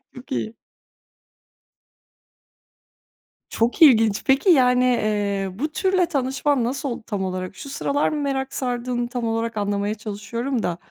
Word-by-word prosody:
Çok 255 Hz, +3 st, -13 dB
iyi. 220 Hz, -3 st, -3 dB, 2.9 s
Çok 235 Hz, +8 st, -1 dB
ilginç. 225 Hz, -8 st, +6 dB
Peki 270 Hz, +8 st, +3 dB
yani, 250 Hz, -5 st, +5 dB
eee, 205 Hz, -5 st, 0 dB
bu 300 Hz, +2 st, -2 dB
türle 375 Hz, 0 st, +2 dB
tanışman 275 Hz, -3 st, 0 dB
nasıl 265 Hz, +3 st, -2 dB
oldu 235 Hz, -2 st, -5 dB
tam 200 Hz, -4 st, -2 dB
olarak? 185 Hz, 0 st, -4 dB
Şu 280 Hz, -, -9 dB
sıralar 280 Hz, +1 st, 0 dB
mı 300 Hz, -1 st, -3 dB
merak 270 Hz, -1 st, -2 dB
sardığını 245 Hz, -1 st, -2 dB
tam 245 Hz, -1 st, -4 dB
olarak 225 Hz, 0 st, -2 dB
anlamaya 205 Hz, +1 st, -1 dB
çalışıyorum 220 Hz, +4 st, -4 dB
da, 170 Hz, -1 st, -1 dB
245 Hz, 130 wpm, -22 LUFS, 215-275 Hz, 2.9 s, ilginç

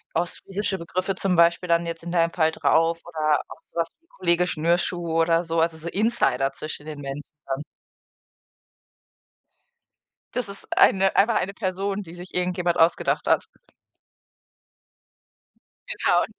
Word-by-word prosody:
ostfriesische 190 Hz, +3 st, -2 dB
Begriffe 185 Hz, +2 st, -2 dB
zum 185 Hz, -2 st, +1 dB
Beispiel 170 Hz, +1 st, +4 dB
dann 170 Hz, 0 st, +3 dB
jetzt 165 Hz, 0 st, -5 dB
in 170 Hz, -, -5 dB
deinem 170 Hz, -1 st, +2 dB
Fall 160 Hz, -2 st, +2 dB
drauf 165 Hz, +1 st, +2 dB
oder 155 Hz, -3 st, +1 dB
auch -, -, -11 dB
so -, -, -16 dB
was 165 Hz, -, +1 dB
wie 330 Hz, -, -37 dB
„Kollege 175 Hz, 0 st, +2 dB
Schnürschuh“ 170 Hz, 0 st, 0 dB
oder 165 Hz, +1 st, +2 dB
so, 165 Hz, 0 st, +1 dB
also, 165 Hz, 0 st, +1 dB
so 160 Hz, +1 st, -4 dB
Insider 170 Hz, -, +1 dB
zwischen 150 Hz, +1 st, -6 dB
den 155 Hz, -2 st, -7 dB
Menschen 140 Hz, +1 st, -5 dB, 0.2 s
dann. 135 Hz, +2 st, -3 dB, 2.7 s
Das 250 Hz, -4 st, -2 dB
ist 200 Hz, -, -10 dB
eine 195 Hz, 0 st, +4 dB
einfach 220 Hz, +2 st, +4 dB
eine 195 Hz, 0 st, 0 dB
Person, 195 Hz, 0 st, -2 dB
die 175 Hz, -2 st, -11 dB
sich 180 Hz, +1 st, -10 dB
irgendjemand 180 Hz, -1 st, 0 dB
ausgedacht 165 Hz, +1 st, +2 dB
hat. -, -, +3 dB, 2.4 s
Genau. -, -, +2 dB
170 Hz, 140 wpm, -24 LUFS, 165-185 Hz, 2.7 s, Beispiel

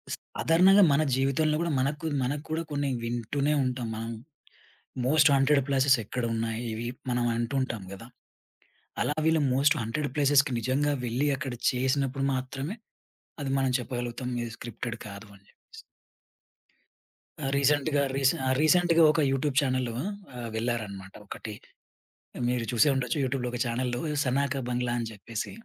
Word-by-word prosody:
సాధారణంగా 185 Hz, +5 st, +4 dB
మన 140 Hz, +2 st, +3 dB
జీవితంలో 140 Hz, +4 st, +1 dB
కూడా 170 Hz, -1 st, 0 dB
మనకు 145 Hz, +4 st, -1 dB, 0.2 s
మనకు 145 Hz, +4 st, -2 dB
కూడా 160 Hz, +1 st, -1 dB
కొన్ని 145 Hz, -1 st, -1 dB
వింటూనే 120 Hz, +5 st, -1 dB
ఉంటాం. 125 Hz, -2 st, -2 dB
మనం 115 Hz, +1 st, -4 dB, 0.9 s
మోస్ట్ 150 Hz, +2 st, +5 dB
హాంటెడ్ 140 Hz, +1 st, +4 dB
ప్లేసెస్ 135 Hz, -1 st, +4 dB
ఎక్కడున్నాయి 115 Hz, 0 st, -2 dB
ఇవి 115 Hz, +2 st, -4 dB, 0.2 s
మనం 120 Hz, -1 st, +1 dB
అంటూ 120 Hz, +3 st, -2 dB
ఉంటాం 115 Hz, -6 st, -3 dB
కదా. 105 Hz, +4 st, -10 dB, 0.9 s
అలా 150 Hz, -, 0 dB
వీళ్ళు 160 Hz, -1 st, +3 dB
మోస్ట్ 140 Hz, +3 st, +4 dB
హాంటెడ్ 120 Hz, +6 st, -2 dB
ప్లేసెస్‌కి 145 Hz, -1 st, +4 dB
నిజంగా 140 Hz, +5 st, +1 dB
వెళ్లి 125 Hz, +5 st, 0 dB
అక్కడ 135 Hz, -3 st, -4 dB, 0.2 s
చేసినప్పుడు 135 Hz, +1 st, 0 dB
మాత్రమే 135 Hz, +7 st, -4 dB, 0.7 s
అది 135 Hz, -1 st, -2 dB
మనం 135 Hz, -1 st, +1 dB
చెప్పగలుగుతాం, 125 Hz, 0 st, -4 dB
ఇది 115 Hz, -1 st, -6 dB
స్క్రిప్టెడ్ 120 Hz, 0 st, -6 dB
కాదు 100 Hz, +1 st, -9 dB
అని 100 Hz, 0 st, -22 dB
చెప్పేసి. 450 Hz, -, -16 dB, 1.6 s
ఆ! -, -, 0 dB
రీసెంట్‌గా 145 Hz, +1 st, +2 dB
రీస్ 135 Hz, -1 st, +4 dB
ఆ! -, -, 0 dB
రీసెంట్‌గా 170 Hz, +1 st, +4 dB
ఒక 155 Hz, -, +1 dB
యూట్యూబ్ 135 Hz, 0 st, -1 dB
చానెల్ 130 Hz, -3 st, 0 dB
ఆహ్, 140 Hz, -, -6 dB
వెళ్లారన్నమాట 110 Hz, -5 st, -3 dB
ఒకటి. 110 Hz, +2 st, -7 dB, 1.0 s
మీరు 125 Hz, -2 st, -1 dB
చూసే 120 Hz, +5 st, +4 dB
ఉండొచ్చు 125 Hz, 0 st, -1 dB
యూట్యూబ్‌లో 125 Hz, -1 st, -1 dB
ఒక 125 Hz, -, -3 dB
చానెల్‌లో 120 Hz, +1 st, -2 dB, 0.2 s
'సనాక 135 Hz, +1 st, 0 dB
బంగ్లా' 125 Hz, 0 st, -1 dB
అని 115 Hz, -1 st, -3 dB
చెప్పేసి 110 Hz, +1 st, -6 dB
130 Hz, 140 wpm, -28 LUFS, 120-145 Hz, 1.6 s, మోస్ట్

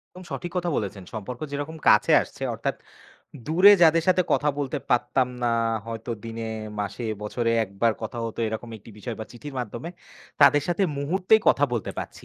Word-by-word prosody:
একদম 185 Hz, 0 st, -10 dB
সঠিক 175 Hz, -, -4 dB
কথা 175 Hz, -1 st, 0 dB
বলেছেন। 100 Hz, -2 st, -4 dB
সম্পর্ক 115 Hz, +3 st, -6 dB
যেরকম 145 Hz, +3 st, -4 dB
কাছে -, -, +5 dB
আসছে -, -, -11 dB
অর্থাৎ -, -, -2 dB, 0.7 s
দূরে 185 Hz, +6 st, +7 dB
যাদের 165 Hz, 0 st, +6 dB
সাথে 185 Hz, 0 st, +4 dB
কথা 150 Hz, -, +2 dB
বলতে 145 Hz, +1 st, -2 dB
পারতাম 125 Hz, +1 st, +2 dB
না, 120 Hz, -, +2 dB, 0.4 s
হয়তো 115 Hz, +1 st, -6 dB
দিনে, 115 Hz, 0 st, -5 dB, 0.4 s
মাসে, 110 Hz, +3 st, -4 dB, 0.2 s
বছরে 115 Hz, +2 st, -1 dB
১ 100 Hz, -, -16 dB
বার 115 Hz, -, +5 dB
কথা 110 Hz, +2 st, -5 dB
হতো 115 Hz, 0 st, -5 dB
এরকম 110 Hz, +2 st, -5 dB
একটি 110 Hz, -, -15 dB
বিষয় 115 Hz, +1 st, -5 dB
বা -, -, -4 dB
চিঠির 135 Hz, +4 st, -9 dB
মাধ্যমে, 120 Hz, +6 st, -6 dB, 0.5 s
তাদের 145 Hz, 0 st, +6 dB
সাথে 175 Hz, +3 st, +1 dB, 0.2 s
মুহূর্তেই 185 Hz, +9 st, +3 dB
কথা 145 Hz, -, +4 dB
বলতে 115 Hz, -5 st, -2 dB
পারছি। -, -, -7 dB
125 Hz, 175 wpm, -25 LUFS, 115-160 Hz, 0.7 s, দূরে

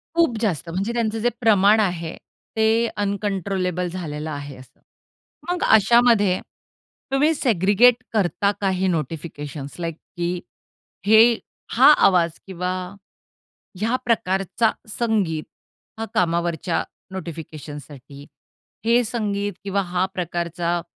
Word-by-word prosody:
खूप 330 Hz, -9 st, +3 dB
जास्त 175 Hz, -, -1 dB
म्हणजे 195 Hz, +7 st, -2 dB
त्यांचं 225 Hz, -2 st, -1 dB
जे 240 Hz, +2 st, +2 dB
प्रमाण 210 Hz, -1 st, +5 dB
आहे 175 Hz, -5 st, -1 dB, 0.4 s
ते 220 Hz, +1 st, +3 dB
अनकंट्रोलेबल 195 Hz, -3 st, -1 dB
झालेलं 160 Hz, -4 st, -5 dB
आहे 145 Hz, -2 st, -6 dB
असं. 130 Hz, +1 st, -17 dB, 0.7 s
मग 355 Hz, 0 st, -1 dB
अशामध्ये 220 Hz, -3 st, +4 dB, 0.7 s
तुम्ही 290 Hz, +4 st, +3 dB
सेग्रीगेट 235 Hz, -, +3 dB
करता 200 Hz, -1 st, +1 dB
का 195 Hz, -, +2 dB
हे 190 Hz, 0 st, 0 dB
नोटिफिकेशन्स 150 Hz, -3 st, -4 dB
लाइक 165 Hz, -2 st, -3 dB, 0.2 s
की 175 Hz, +1 st, -1 dB, 0.7 s
हे 220 Hz, +2 st, +8 dB, 0.5 s
हा 265 Hz, +5 st, +8 dB
आवाज 175 Hz, -3 st, +4 dB, 0.2 s
किंवा 180 Hz, -1 st, -3 dB, 1.1 s
ह्या 225 Hz, +4 st, +1 dB
प्रकारचा 195 Hz, -1 st, +1 dB, 0.2 s
संगीत 205 Hz, -9 st, 0 dB, 0.6 s
हा 225 Hz, -, -2 dB
कामावरच्या 170 Hz, -1 st, 0 dB, 0.3 s
नोटिफिकेशनसाठी, 150 Hz, -5 st, -9 dB, 0.6 s
हे 235 Hz, +2 st, +4 dB
संगीत 205 Hz, -3 st, -2 dB
किंवा 200 Hz, 0 st, 0 dB
हा 180 Hz, 0 st, 0 dB
प्रकारचा 175 Hz, 0 st, -2 dB
190 Hz, 105 wpm, -22 LUFS, 170-220 Hz, 1.1 s, हे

